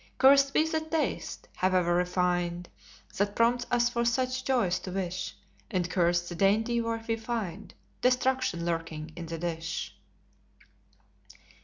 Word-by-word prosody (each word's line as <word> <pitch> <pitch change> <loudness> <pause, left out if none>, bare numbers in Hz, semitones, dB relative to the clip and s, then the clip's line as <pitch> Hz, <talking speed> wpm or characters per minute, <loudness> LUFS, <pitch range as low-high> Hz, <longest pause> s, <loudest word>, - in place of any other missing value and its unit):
Cursed 275 +1 +6
be 315 - +4
the 320 0 0
taste, 315 +9 -2
howe'er 185 -2 +2
refined, 175 -1 0 0.5
That 200 +1 0
prompts 245 +1 +2
us 240 -1 +3
for 240 -1 -1
such 255 +2 0
joys 215 -10 +1
to 185 - -7
wish; 185 -1 -3 0.3
And 180 -2 0
cursed 175 -1 +2
the 175 - -5
dainty 220 +6 +2
where 230 0 -3
we 225 - +1
find 220 -4 -5 0.3
Destruction 250 -8 +1
lurking 165 -2 -3
in 170 -1 -7
the 165 0 -4
dish. 165 -1 -4
195 Hz, 135 wpm, -29 LUFS, 175-245 Hz, 0.5 s, Cursed